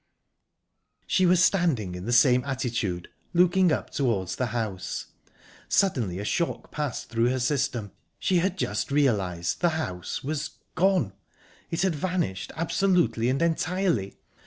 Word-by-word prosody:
She 185 -1 +3
was 180 0 +5
standing 150 - +1
in 90 +1 -6
the 120 - -2
same 125 +1 +5
attitude 115 -10 -2 0.3
looking 180 0 +4
up - - -2
towards 100 -9 0
the 125 - -1
house. 110 -5 -4 0.6
Suddenly 125 - +1
a 100 - -4
shock 170 +9 -2
passed 150 -5 -3
through 115 +1 +2
her 130 +1 0
system. 125 -5 -1 0.3
She 185 - +1
had 185 +2 0
just 105 - -1
realised 100 -12 +1
the 175 - +4
house 90 - -4
was 150 +2 -3 0.2
gone. 180 - +2 0.6
It 170 +2 -1
had 190 -3 +2
vanished, 160 - -2
absolutely 170 -7 +2
and 135 +5 +1
entirely. 170 - 0
135 Hz, 135 wpm, -26 LUFS, 105-175 Hz, 0.6 s, was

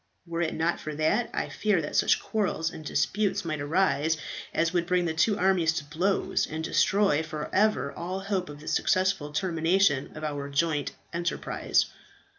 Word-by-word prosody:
Were 170 0 -3
it 160 - -1
not 165 +2 0
for 155 -1 -5
that, 155 +10 +1
I - - -2
fear 210 -4 +1
that 150 - -4
such - - +4
quarrels 190 -6 -1
and 155 - -9
disputes 200 +5 0
might 155 -3 -2
arise 160 0 +1 0.3
as 165 +1 +1
would 170 -1 +1
bring 180 -1 +2
the 160 - -1
two 200 +6 +2
armies 180 -4 +3
to 155 - -3
blows, 165 +7 0
and 160 +1 -4
destroy 195 -1 +3
for 155 -2 -6
ever 190 -10 +2
all 185 +3 -4
hope 195 -3 -2
of 145 0 -10
the - - -12
successful 185 -1 +1
termination 165 -2 +1
of 155 - -7
our 145 -2 -3
joint 150 0 0 0.2
enterprise." 170 0 0
165 Hz, 175 wpm, -27 LUFS, 155-190 Hz, 0.3 s, such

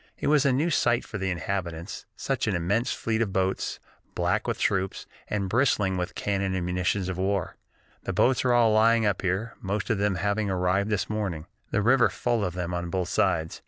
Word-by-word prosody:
It - - -5
was 145 -1 +4
a - - +4
new 150 +7 +1
sight 120 -5 +2
to 105 - -4
the 95 0 -1
inhabitants, 90 0 -4
such 135 -4 -2
an 105 - +1
immense 100 +9 0
fleet 115 0 -1
of 110 -4 0
boats, 95 0 -1 0.4
black - - 0
with - - -1
troops, 95 -1 -1 0.2
and 100 -2 -1
bristling 105 -4 +2
with 90 -1 -3
cannon 100 -2 -1
and 90 -2 -2
munitions 90 +1 0
of 95 -1 -4
war. 95 -2 -1 0.5
The - - -1
boats 130 0 +2
are 125 - +2
all 120 -2 +4
lying 115 +1 +4
up 100 -3 +1
here, 95 +5 -1
most 100 +3 -2
of 105 - 0
them 100 -1 +1
having 100 +2 0
arrived 95 +2 +1
this 105 -2 0
morning, 100 -7 -3 0.2
the 105 - 0
river 125 +2 +5
full 120 -3 -1
of 90 -3 -2
them 90 -1 -3
on 85 0 -3
both 90 0 -2
sides. 80 0 0
100 Hz, 205 wpm, -26 LUFS, 90-115 Hz, 0.5 s, river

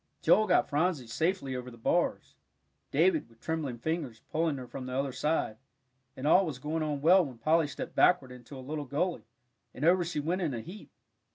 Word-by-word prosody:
Joel 215 - +5
got - - +3
Phronsie 150 -2 0
safely 150 +2 -1
over 125 0 -5
the 120 - -13
bars, 115 - 0 0.6
David, 160 -2 +2
with 115 -1 -23
trembling 155 -6 -3
fingers, 145 -4 -3
pulling 160 -2 0
her 130 - -7
from 130 +1 -7
the 130 - -4
other 135 0 -1
side, 150 -6 -1 0.6
and 130 - -5
all 180 +6 +6
was 155 -8 -4
going 155 +5 -3
on 150 -2 -2
well 180 +5 +6
when 130 -6 -7
Polly 155 +6 +2
stepped 140 - -6
backward 135 -8 +3
into 125 +2 -11
a 130 - -9
little 150 +1 -4
gully, 145 - -2 0.5
and 140 - -2
over 175 +1 +5
she 170 -2 -3
went 170 +6 -1
in 155 -8 -1
a 115 - -4
heap. 185 - -11
150 Hz, 200 wpm, -30 LUFS, 130-165 Hz, 0.6 s, all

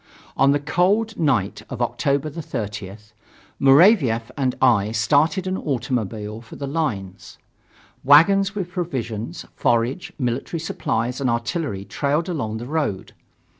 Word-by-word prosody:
On 135 0 +4
the 145 - +2
cold 190 +9 +1
night 130 - +1
of - - -6
October 140 +2 0
30th, 105 - -6 0.5
Muravief 135 - +5
and 130 -3 0
I 110 -5 +3
started 145 - +2
by 185 - -2
automobile 110 -5 -3
for 115 - -13
the 140 - -5
lines. 110 - -4 0.7
Wagons 195 +8 +5
with 185 -3 -4
provisions, 125 - -4
forage, 120 +8 0
military 130 +5 -2
supplies 125 -5 -2
and 130 - +1
artillery 115 - -2
trailed 150 - -1
along 125 -11 -3
the 120 - -6
road. 145 -9 -2
135 Hz, 125 wpm, -22 LUFS, 110-160 Hz, 0.7 s, Muravief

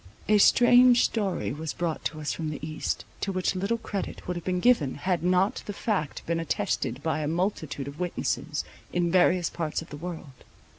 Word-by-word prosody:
A 210 0 +5
strange 245 +3 +6
story 200 - -1
was 155 +1 -4
brought 170 -2 -2
to 155 - -2
us 150 - -2
from 160 -2 -3
the 150 - -4
East, 155 0 -3
to 195 - -2
which 185 -1 0
little 195 +5 -1
credit 210 -3 -5
would 180 - -2
have 175 - -5
been 180 0 0
given, 180 - +3
had 175 +3 -1
not 185 +3 +2
the 205 - -3
fact 195 -8 -2
been 165 0 0
attested 140 -4 -2
by 160 -1 0
a 150 - -2
multitude 160 -5 -2
of 140 +3 -8
witnesses, 170 -3 -2 0.3
in 175 -1 +1
various 180 -1 +3
parts 165 -1 -3
of 165 - -17
the 145 - -6
world. 160 -5 -8
175 Hz, 195 wpm, -27 LUFS, 155-195 Hz, 0.3 s, strange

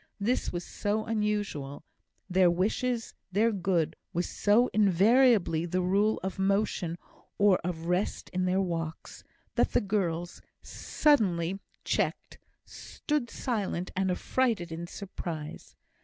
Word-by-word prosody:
This 235 +6 0
was 175 0 -4
so 210 +4 -2
unusual 205 -11 -2 0.4
their 185 -1 +4
wishes, 225 +7 -1 0.2
their 220 +5 +3
good, 175 -5 0 0.2
was 175 0 0
so 220 +4 +3
invariably 205 -3 +4
the 180 +2 0
rule 200 +4 +2
of 190 0 -4
motion 195 -3 0 0.4
or 200 -2 +4
of 165 -2 -4
rest 180 +3 -1
in 185 0 -1
their 185 +1 +2
walks 165 -3 -4 0.3
that - - +1
the - - +5
girls, 175 -4 -2 0.2
suddenly 195 - +1 0.2
checked, - - -2 0.3
stood 295 -6 -3
silent 205 -7 -3
and 190 0 +1
affrighted 205 -2 0
in 170 +1 -5
surprise. 170 -6 -7
190 Hz, 120 wpm, -29 LUFS, 175-215 Hz, 0.4 s, the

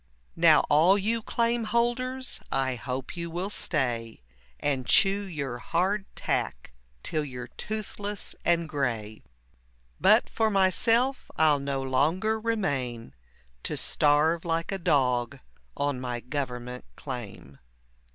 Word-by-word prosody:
Now - - +6
all 165 +7 +4
you 225 +3 0
claim 235 +1 0
holders, 250 +3 -1
I 135 -1 +1
hope 125 +2 -5
you 170 -1 -4
will 180 +5 -3
stay 120 - -1 0.4
And 135 -4 -1
chew 200 +1 +4
your 140 -8 -4
hard 190 +8 0
tack - - -2 0.3
till 155 -2 -1
you're 125 -3 -7
toothless 210 -1 -5
and 170 -1 +2
gray; 115 -8 -2 0.8
But - - +5
for 220 -1 +1
myself, 225 +7 +2
I'll 155 -2 +4
no 140 -1 -2
longer 165 +12 +1
remain 140 - -2 0.5
To - - -4
starve 150 +3 +2
like 165 +1 -1
a 195 - -2
dog 125 -7 +1 0.4
on 145 -3 -1
my 125 -1 -3
government 125 - -5
claim. 100 - -8
150 Hz, 120 wpm, -27 LUFS, 125-200 Hz, 0.8 s, Now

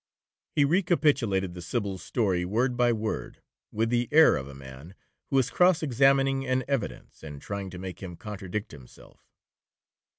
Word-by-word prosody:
He 145 - +4
recapitulated 140 - +1
the 90 - -8
Sybil's 100 0 -3
story 95 -7 0
word 120 +7 0
by 120 0 +3
word, 110 -1 -4 0.3
with 115 +2 0
the 120 -1 +1
air 160 +1 +7
of 65 - -4
a 70 - -11
man 70 +6 -12 0.3
who 135 - +1
is 130 -1 +2
cross 180 -2 +3
examining 135 0 +3
an 130 -1 0
evidence, 135 -5 -4
and 75 -2 -9
trying 100 +4 -5
to 90 - -9
make 90 -1 -7
him 90 -2 -7
contradict 105 +1 -6
himself. 65 -5 -16
110 Hz, 160 wpm, -27 LUFS, 90-135 Hz, 0.3 s, air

